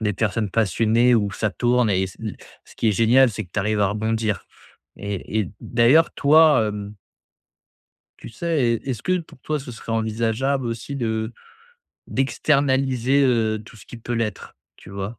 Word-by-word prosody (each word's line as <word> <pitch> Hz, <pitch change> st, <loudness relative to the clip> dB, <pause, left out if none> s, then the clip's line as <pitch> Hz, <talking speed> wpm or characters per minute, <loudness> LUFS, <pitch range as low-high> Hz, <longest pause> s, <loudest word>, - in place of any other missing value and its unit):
des 105 Hz, -2 st, -1 dB
personnes 105 Hz, +1 st, -1 dB
passionnées, 115 Hz, +4 st, +2 dB
où 105 Hz, -3 st, +1 dB
ça 105 Hz, -, -1 dB
tourne 120 Hz, +2 st, +1 dB
et 95 Hz, -1 st, +1 dB
s 95 Hz, -, -9 dB
l 110 Hz, -2 st, -5 dB, 0.3 s
ce -, -, -18 dB
qui 115 Hz, -, +1 dB
est -, -, +3 dB
génial 120 Hz, +5 st, +4 dB
c'est 110 Hz, 0 st, -5 dB
que 90 Hz, -, -22 dB
tu -, -, -2 dB
arrives 105 Hz, +1 st, 0 dB
à 100 Hz, -, +3 dB
rebondir. 110 Hz, 0 st, -2 dB, 0.5 s
Et 100 Hz, +2 st, -3 dB
et 100 Hz, -, -4 dB
d'ailleurs 125 Hz, +8 st, +3 dB
toi, 150 Hz, -5 st, +5 dB
hem 105 Hz, 0 st, -6 dB, 1.2 s
tu -, -, -10 dB
sais, 125 Hz, -2 st, 0 dB
e -, -, -8 dB
est-ce 125 Hz, -6 st, -3 dB
que 185 Hz, 0 st, +1 dB
pour 165 Hz, -6 st, -12 dB
toi 155 Hz, +3 st, -2 dB
ce 135 Hz, -3 st, -9 dB
serait 115 Hz, 0 st, -7 dB
envisageable 115 Hz, +4 st, -1 dB
aussi 115 Hz, +4 st, -5 dB
de 110 Hz, -2 st, -2 dB, 0.7 s
d'externaliser, 135 Hz, -1 st, +1 dB
heu, 110 Hz, -4 st, +1 dB
tout 110 Hz, -, -15 dB
ce 105 Hz, -, -16 dB
qui -, -, -10 dB
peut 120 Hz, +1 st, -5 dB
l'être, 110 Hz, -4 st, -4 dB, 0.2 s
tu -, -, -14 dB
vois? 100 Hz, +3 st, -6 dB
115 Hz, 180 wpm, -22 LUFS, 105-130 Hz, 1.2 s, toi